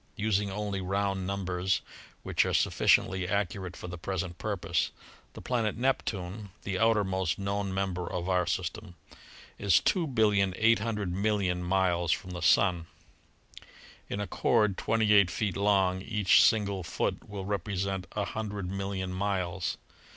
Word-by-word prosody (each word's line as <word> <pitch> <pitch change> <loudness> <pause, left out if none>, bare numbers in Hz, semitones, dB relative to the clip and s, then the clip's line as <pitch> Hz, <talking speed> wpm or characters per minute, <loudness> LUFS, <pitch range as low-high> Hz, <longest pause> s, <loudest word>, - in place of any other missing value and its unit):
Using 105 -1 0
only 100 0 -3
round 95 0 -1
numbers, 95 -1 -1 0.4
which - - +2
are - - -1
sufficiently 95 0 +3
accurate 95 -2 -2
for - - -8
the 90 -1 -7
present 95 0 -4
purpose, 85 -6 -1 0.4
the - - -10
planet 115 -4 -1
Neptune, 105 -6 -2
the 95 -2 -2
outermost 95 -5 +1
known 100 0 -2
member 95 -2 -2
of 90 0 -3
our 90 -2 +1
system, 95 +2 -3 0.6
is 100 -4 +3
2,800,000,000 105 - +1
miles 90 -2 +1
from 90 - -2
the 90 -1 -6
Sun. 90 -1 +3 1.2
In 100 - -3
a 105 - -1
cord 105 +1 +2
twenty 110 0 +2
eight 100 -3 +6
feet 100 +1 -2
long 95 -2 +2
each 105 -2 +4
single 100 -3 +2
foot 90 +3 -3
will 100 -2 -5
represent 95 -1 -2
a 105 -1 -1
hundred 105 -4 -4
million 95 -1 -3
miles. 95 -2 -2
95 Hz, 130 wpm, -29 LUFS, 90-105 Hz, 1.2 s, eight